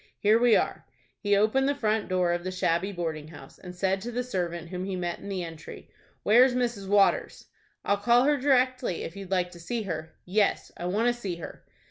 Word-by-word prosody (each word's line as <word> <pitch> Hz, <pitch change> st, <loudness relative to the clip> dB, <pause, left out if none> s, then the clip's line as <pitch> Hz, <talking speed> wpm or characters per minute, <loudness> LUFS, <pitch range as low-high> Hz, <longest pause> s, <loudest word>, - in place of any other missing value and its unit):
Here 215 Hz, +2 st, +4 dB
we 240 Hz, -2 st, +5 dB
are." -, -, -1 dB, 0.3 s
He 205 Hz, -1 st, +2 dB
opened 220 Hz, +7 st, +2 dB
the 285 Hz, -, 0 dB
front 220 Hz, -5 st, 0 dB
door 180 Hz, -1 st, +2 dB
of 175 Hz, 0 st, -3 dB
the 185 Hz, -, -3 dB
shabby 185 Hz, +1 st, 0 dB
boarding 160 Hz, -4 st, -4 dB
house, 160 Hz, -, -13 dB
and 180 Hz, -1 st, -10 dB
said 190 Hz, +1 st, 0 dB
to 240 Hz, -, -5 dB
the 245 Hz, +1 st, -2 dB
servant 175 Hz, -7 st, -3 dB
whom 180 Hz, 0 st, -4 dB
he 190 Hz, 0 st, -3 dB
met 175 Hz, -1 st, -3 dB
in 200 Hz, -, -9 dB
the 190 Hz, -2 st, -3 dB
entry, 165 Hz, -2 st, -10 dB, 0.3 s
"Where's 245 Hz, +4 st, +5 dB
Mrs. 235 Hz, -6 st, -1 dB
Waters?" 200 Hz, 0 st, +2 dB, 0.4 s
"I'll 200 Hz, -, +2 dB
call 235 Hz, +4 st, +4 dB
her 295 Hz, +1 st, +3 dB
directly, 255 Hz, -, +1 dB
if 165 Hz, -, -7 dB
you'd 195 Hz, -2 st, -8 dB
like 180 Hz, -2 st, 0 dB
to 175 Hz, -, -12 dB
see 225 Hz, +7 st, -3 dB
her." 160 Hz, -4 st, -5 dB
"Yes, 200 Hz, +3 st, +1 dB
I 175 Hz, -, -5 dB
want 210 Hz, +6 st, 0 dB
to -, -, +1 dB
see 205 Hz, -7 st, -5 dB
her." 170 Hz, -, -9 dB
195 Hz, 215 wpm, -27 LUFS, 175-235 Hz, 0.4 s, we